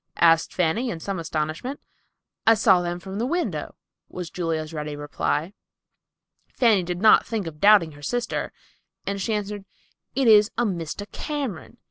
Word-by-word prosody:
asked 165 -1 +4
Fanny, 185 +8 0
in 170 - -4
some 195 +2 -4
astonishment. 160 - -3 0.7
"I 225 - +8
saw 195 -4 +4
them 175 0 -3
from 190 +2 -7
the 235 - 0
window," 345 +4 -2 0.3
was 180 -2 -7
Julia's 165 -2 -3
ready 150 -1 -4
reply. 145 +4 -2 1.0
Fanny 225 -6 +3
did 180 +2 -4
not 215 - +7
think 220 -4 -3
of 155 -2 -8
doubting 200 -4 +6
her 145 0 -14
sister, 240 +10 -2 0.5
and 200 0 -3
she 220 +3 0
answered, 205 -1 -4 0.5
"It 265 -2 +2
is 210 -1 +7
a 240 - +2
Mr. 180 0 -3
Cameron. 265 - -5
190 Hz, 155 wpm, -24 LUFS, 165-220 Hz, 1.0 s, I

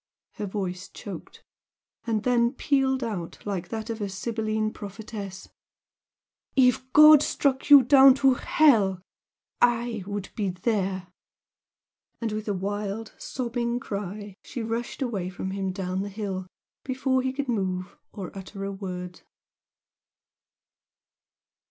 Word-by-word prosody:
her 205 - -3
voice 185 -2 -4
choked, - - -9 0.6
and 220 -2 0
then 240 -1 +3
pealed 265 -2 +1
out 195 -8 -4
like 195 -4 -3
that 220 -1 -4
of 225 -2 -4
a 200 - -2
Sybilline 215 +1 -2
prophetess, 200 -1 -7 1.1
"If 255 0 +3
God 305 0 +9
struck 275 -2 0
you 285 -2 +10
down 270 +1 +8
to 270 -1 +4
hell, 215 -10 +3 0.6
I 235 -3 +2
would 205 -1 -4
be 205 -3 -1
there!" 185 -1 -1 1.1
And 230 -2 -2
with 215 +1 -4
a 205 - +1
wild, 205 +3 -3
sobbing 240 -1 -2
cry 205 -1 -5
she 240 - -5
rushed 230 +4 -3
away 200 -8 -2
from 190 +1 -5
him 190 -1 -2
down 185 0 -3
the 200 - -4
hill 195 -3 -4 0.4
before 260 0 0
he 260 0 -1
could 275 +1 -3
move 190 -5 -2 0.2
or 195 -2 -7
utter 195 +1 -7
a 200 - -3
word. 180 -2 -6
215 Hz, 125 wpm, -26 LUFS, 195-245 Hz, 1.1 s, you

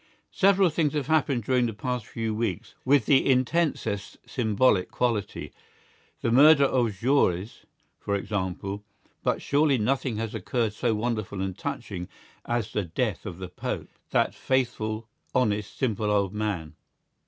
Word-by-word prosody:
Several 195 -2 +4
things 150 -2 +1
have 145 -3 -1
happened 140 -5 +1
during 125 +1 +2
the 115 - -5
past 125 -1 -3
few 115 -1 -3
weeks 105 -5 -3
with 135 -3 +4
the 135 +3 +5
intensest 130 -6 0
symbolical 110 -4 +2
quality; 115 -5 -2 0.7
the 115 - 0
murder 140 +3 +7
of 130 -3 +3
Jaurès, 105 -3 0 0.3
for 100 - -1
example; 100 0 -3 0.4
but - - 0
surely 145 -1 +3
nothing 125 +1 0
has 110 -1 -3
occurred 110 +1 -1
so 115 +1 0
wonderful 110 -3 -2
and 95 -1 -2
touching 105 -8 -5 0.4
as 120 -2 -2
the 105 - 0
death 100 +4 -2
of 85 - -6
the 95 0 -6
Pope, 90 - -4 0.2
that - - +2
faithful, 115 -4 -1 0.3
honest, 105 -5 0
simple 110 -5 0
old 100 -2 +1
man. 100 -7 -3
115 Hz, 140 wpm, -27 LUFS, 105-130 Hz, 0.7 s, murder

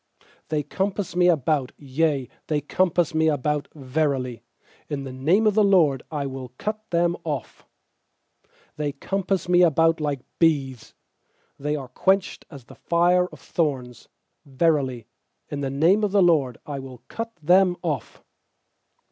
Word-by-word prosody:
uThey 150 -1 -1
compass 195 -2 -2
me 180 0 +4
about, 150 -5 +1
yea, 140 -1 0 0.2
they 150 -1 +1
compass 175 +2 +1
me 160 0 +2
about; 150 0 -1
Verily, 130 -4 -1 0.5
in 145 -2 -3
the 130 -1 -7
name 165 +12 +2
of 215 - +4
the 215 +1 +4
LORD 165 -10 +4
I 150 -3 -3
will 130 -2 -7
cut 215 0 -5
them 170 0 +2
off. 145 -6 -5 1.1
12They 145 -2 -3
compass 195 -1 -1
me 180 0 +4
about 165 -1 +4
like 145 -3 -2 0.2
bees;, 140 -7 +1 0.6
They 150 +2 -1
are 135 -3 -5
quenched 190 +9 0
as 140 -5 -11
the - - -14
fire 175 +1 +2
of - - -14
thorns; 130 -8 -3 0.4
Verily, 135 -5 0 0.4
in 145 -1 -4
the 135 - -1
name 165 +10 +3
of 205 - +1
the 200 -1 +4
LORD 145 -9 +2
I 145 -2 -5
will 130 -2 -10
cut 230 0 -6
them 180 +3 +4
off. 150 -8 -4
155 Hz, 150 wpm, -24 LUFS, 135-175 Hz, 1.1 s, me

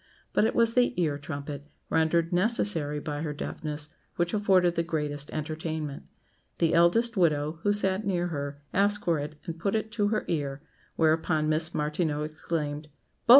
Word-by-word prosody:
But - - +4
it - - 0
was 230 -1 +4
the 245 -4 +3
ear 150 -4 +1
trumpet, 145 -1 -6 0.2
rendered 165 +1 +2
necessary 175 -7 +1
by 145 0 -4
her 155 -2 -2
deafness, 150 0 -5 0.3
which 175 +2 0
afforded 190 -4 +4
the 170 - +1
greatest 150 -3 -2
entertainment. 155 -1 -4 0.5
The 165 -1 +2
eldest 205 +8 +4
widow, 155 -2 +2
who 205 - +2
sat 195 -1 +1
near 175 -3 0
her, 145 -2 -4
asked 205 +1 +2
for 170 -4 +2
it 150 +1 -5
and 165 -2 -5
put 200 +5 0
it 220 0 -1
to 210 -2 +1
her 215 0 0
ear; 145 -3 -2 0.3
whereupon 160 -1 +2
Miss 160 +2 0
Martineau 150 0 0
exclaimed, 150 -1 -3 0.4
"Bo!" - - -16
160 Hz, 165 wpm, -28 LUFS, 150-185 Hz, 0.5 s, But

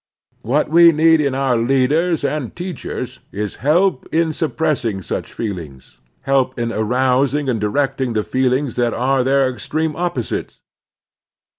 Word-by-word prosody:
What 140 +7 +1
we 170 +2 +7
need 160 0 +4
in 140 -3 0
our 135 -2 +1
leaders 135 +7 +1
and 140 -3 -3
teachers 175 -4 -6
is 105 0 -4
help 165 +1 +2
in 160 0 +1
suppressing 150 - -1
such - - -4
feelings, 85 - -7 0.2
help 135 -1 +1
in 120 -1 -2
arousing 130 +5 +1
and 115 -5 -1
directing 135 +3 0
the 105 -1 0
feelings 130 +1 0
that 120 -1 +1
are 130 +1 +1
their 135 +1 +3
extreme 150 +4 -3
opposites. 170 -9 -3
135 Hz, 135 wpm, -19 LUFS, 120-155 Hz, 0.2 s, we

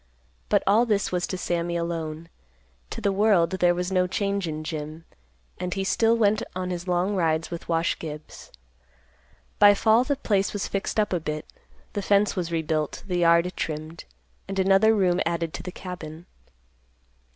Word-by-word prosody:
But - - +3
all 220 +5 +4
this 205 -3 +1
was 180 -1 -1
to 185 - -4
Sammy 170 -1 -2
alone. 165 -1 -4 0.6
To - - -6
the 200 - +1
world, 195 -4 +3
there 175 0 +4
was 180 +2 -2
no 180 -1 +2
change 200 0 -1
in 155 0 -4
Jim, 155 +1 -6 0.5
and 180 +1 -3
he 195 - -1
still 225 +3 +2
went 215 -1 +3
on 185 0 -3
his 175 +1 -5
long 180 +3 +1
rides 165 -2 0
with 170 0 -7
Wash 165 0 +1
Gibbs. 155 -1 -9 1.1
By 205 -1 +8
fall, 220 +3 +4
the 285 +2 0
place 200 -7 0
was 205 - -2
fixed 195 +2 -2
up 210 -2 +1
a 180 - +1
bit; 155 -1 -4 0.5
the 205 - -2
fence 200 +1 +2
was 175 -3 -3
rebuilt, 160 -2 -2
the 180 -3 -1
yard 170 +1 +4
trimmed, 155 +1 -5 0.4
and 195 0 -5
another 195 +3 +4
room 185 -3 +2
added 165 -1 -2
to - - -5
the 180 - -6
cabin. 170 -3 -8
180 Hz, 175 wpm, -25 LUFS, 165-200 Hz, 1.1 s, By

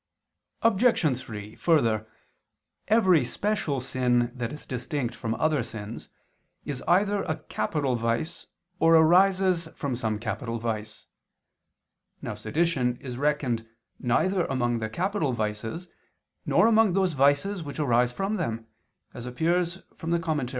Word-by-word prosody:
Obj. 225 - +3
3: 110 -4 -8
Further, 115 -10 +2 0.8
every 190 - +4
special 160 - -1
sin 125 -1 +1
that 120 -2 -4
is 150 - -8
distinct 125 0 -3
from 115 0 -3
other 155 -3 +1
sins, 110 -1 -7 0.6
is 140 -3 -4
either 200 +3 +3
a - - -2
capital 140 -5 -1
vice, 115 +6 -2 0.3
or 165 0 +5
arises 180 +1 +4
from 140 -4 -2
some 110 -3 -1
capital 115 +2 -3
vice. 110 -2 -4 1.1
Now - - -5
sedition 145 -7 0
is 125 -2 -7
reckoned 135 -6 0 0.3
neither 180 +9 +1
among 120 -3 0
the 110 -1 -3
capital 180 - -1
vices, 110 +9 -3 0.6
nor - - +4
among 225 -4 +4
those 190 -2 +2
vices 145 +8 +2
which 145 -3 -7
arise 125 -4 +3
from 195 +9 -2
them, 115 - -3 0.5
as 120 +1 -7
appears 170 +7 0
from 165 - -6
Moral. 155 -6 -1
140 Hz, 130 wpm, -27 LUFS, 120-175 Hz, 1.1 s, or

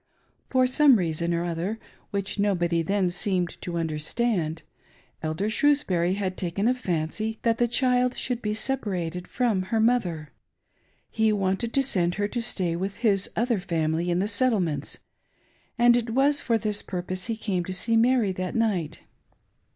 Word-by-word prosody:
For 255 -1 +3
some 270 +1 +5
reason 170 -3 0
or 170 0 0
other, 175 +6 -2 0.3
which 200 -1 -3
nobody 175 -4 +1
then 190 +1 0
seemed 180 -2 0
to 175 -1 -4
understand. 165 +2 -1 0.6
Elder 160 +6 -2
Shrewsbury 205 -8 +2
had 190 -2 -3
taken 185 +4 -1
a 250 - +4
fancy 215 0 -2
that 230 -1 +1
the 240 - +3
child 250 0 +2
should 245 -2 -2
be 210 0 -2
sepa 265 +1 -1
rated 180 -2 -3
from 235 -6 0
her 225 - +1
mother;. 180 -11 +1 0.8
he 220 -1 +2
wanted 200 +3 0
to 275 - +4
send 175 -9 +1
her 205 0 0
to 240 - -2
stay 185 -7 -1
witli 190 +3 -3
his 200 -3 +1
other 235 -1 +1
family 165 -1 -1
in 175 - +1
the 195 +3 0
Settlements, 205 - 0 0.8
and 240 0 +6
it 240 -1 0
was 275 +5 +2
for 230 -2 +1
this 210 -2 -1
pur 180 -2 -5
pose 185 +1 -5
he 225 -2 -2
came 195 -5 -1
to 185 - -5
see 225 +5 0
Mary 230 -3 +3
that 185 0 -4
night. 205 -9 -1
200 Hz, 165 wpm, -26 LUFS, 175-230 Hz, 0.8 s, and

